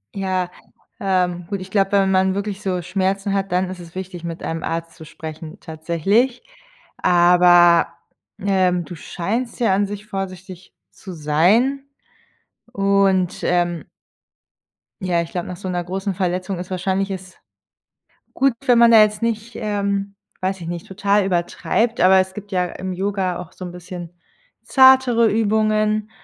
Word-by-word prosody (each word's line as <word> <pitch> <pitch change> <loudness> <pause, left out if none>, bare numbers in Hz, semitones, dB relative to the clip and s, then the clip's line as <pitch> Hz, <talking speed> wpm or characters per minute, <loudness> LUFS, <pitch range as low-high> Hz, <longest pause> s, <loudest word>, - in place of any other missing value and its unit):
Ja, 185 -2 -2 0.5
ähm, 180 -3 0
gut, 200 -1 -3
ich 185 +1 -10
glaube, 195 -1 +1
wenn 195 -1 +3
man 190 0 +2
wirklich 200 0 -4
so 185 -3 -2
Schmerzen 195 +2 -1
hat, 195 -1 -1
dann 180 +1 +1
ist 185 - -8
es 170 -1 -12
wichtig, 185 -2 -7
mit 170 -1 -6
einem 165 0 -4
Arzt 165 0 -4
zu 160 - -12
sprechen 160 +3 -9
tatsächlich. 175 - 0 0.5
Aber, 175 -1 +5 0.5
ähm, 185 -3 +1
du 175 - -8
scheinst 225 - -4
ja 230 -5 +2
an 200 +1 +1
sich 205 +1 -7
vorsichtig 190 -2 -7 0.2
zu 190 - -10
sein. 185 - +2 0.9
Und, 195 -2 +1
ähm 175 -3 0 1.2
Ja, 180 -2 +1
ich 170 - -7
glaube, 175 -1 -4
nach 180 - -6
so 190 - -7
'ner 175 -1 -2
großen 190 +3 -3
Verletzung 185 0 -2
ist 180 +1 -7
wahrscheinlich 190 +1 -1
es 185 -1 -8 1.0
gut, 270 0 +3
wenn 245 -2 +5
man 235 0 +7
da 225 -1 +8
jetzt 210 +1 0
nicht, 230 0 -2
ähm, 200 -1 -2 0.3
weiß 190 0 -2
ich 165 - -7
nicht, 170 -1 -5
total 200 +1 +1
übertreibt. 195 +6 -1
Aber 190 +1 +6
es 185 0 0
gibt 205 0 -10
ja 180 -1 +1
im 185 +1 -6
Yoga 190 -1 -2
auch 175 - -9
so 185 - -9
'n 175 - -7
bisschen 180 -1 -9 0.5
zartere 260 -3 +5
Übungen, 215 0 +1
190 Hz, 155 wpm, -20 LUFS, 175-205 Hz, 1.2 s, da